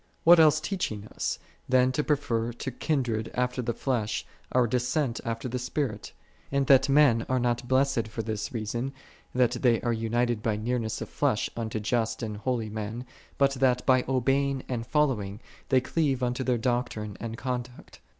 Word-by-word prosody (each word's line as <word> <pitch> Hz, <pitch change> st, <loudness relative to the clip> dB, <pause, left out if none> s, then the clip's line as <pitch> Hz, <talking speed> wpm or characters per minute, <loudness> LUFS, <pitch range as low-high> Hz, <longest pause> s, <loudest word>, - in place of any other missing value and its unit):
'" -, -, -40 dB
What 170 Hz, +1 st, +8 dB
else 155 Hz, -1 st, +6 dB
teaching 135 Hz, -, -3 dB
us, -, -, -2 dB, 0.3 s
than 130 Hz, 0 st, +4 dB
to 150 Hz, +3 st, 0 dB
pre 150 Hz, -, +3 dB
fer 120 Hz, -4 st, -2 dB
to 130 Hz, +3 st, -5 dB
kindred 120 Hz, -6 st, -1 dB
after 125 Hz, +1 st, 0 dB
the 120 Hz, -1 st, -1 dB
flesh, 120 Hz, -6 st, -1 dB, 0.3 s
our 125 Hz, -1 st, +4 dB
descent 125 Hz, +2 st, 0 dB
after 115 Hz, 0 st, -3 dB
the 125 Hz, +1 st, -3 dB
Spirit: 125 Hz, -4 st, -3 dB, 0.4 s
and 140 Hz, 0 st, +2 dB
that 135 Hz, 0 st, +5 dB
men 135 Hz, -5 st, +5 dB
are 130 Hz, -, +2 dB
not 120 Hz, 0 st, 0 dB
blessed 130 Hz, -3 st, +2 dB
for 115 Hz, +1 st, -5 dB
this 110 Hz, +4 st, -3 dB
reason, 120 Hz, +3 st, -3 dB, 0.4 s
that 125 Hz, -2 st, +4 dB
they 120 Hz, -4 st, +4 dB
are 120 Hz, -, 0 dB
united 115 Hz, 0 st, 0 dB
by 110 Hz, -1 st, 0 dB
nearness 110 Hz, 0 st, -2 dB
of 110 Hz, -, -5 dB
flesh 135 Hz, -7 st, 0 dB
unto 110 Hz, -1 st, -3 dB
just 115 Hz, +2 st, -1 dB
and 105 Hz, -2 st, -4 dB
holy 115 Hz, 0 st, -1 dB
men, 110 Hz, +3 st, -5 dB, 0.3 s
but 140 Hz, -1 st, +3 dB
that, 125 Hz, -1 st, +2 dB
by 130 Hz, -1 st, +4 dB
obeying 135 Hz, +1 st, +1 dB
and 115 Hz, -2 st, -3 dB
following, 120 Hz, -10 st, 0 dB, 0.3 s
they 130 Hz, -2 st, +4 dB
cleave 135 Hz, -1 st, 0 dB
unto 125 Hz, +1 st, -1 dB
their 125 Hz, -1 st, +1 dB
doctrine 115 Hz, -4 st, -2 dB
and 115 Hz, -1 st, -5 dB
conduct. 125 Hz, -1 st, -5 dB
125 Hz, 180 wpm, -28 LUFS, 115-130 Hz, 0.4 s, What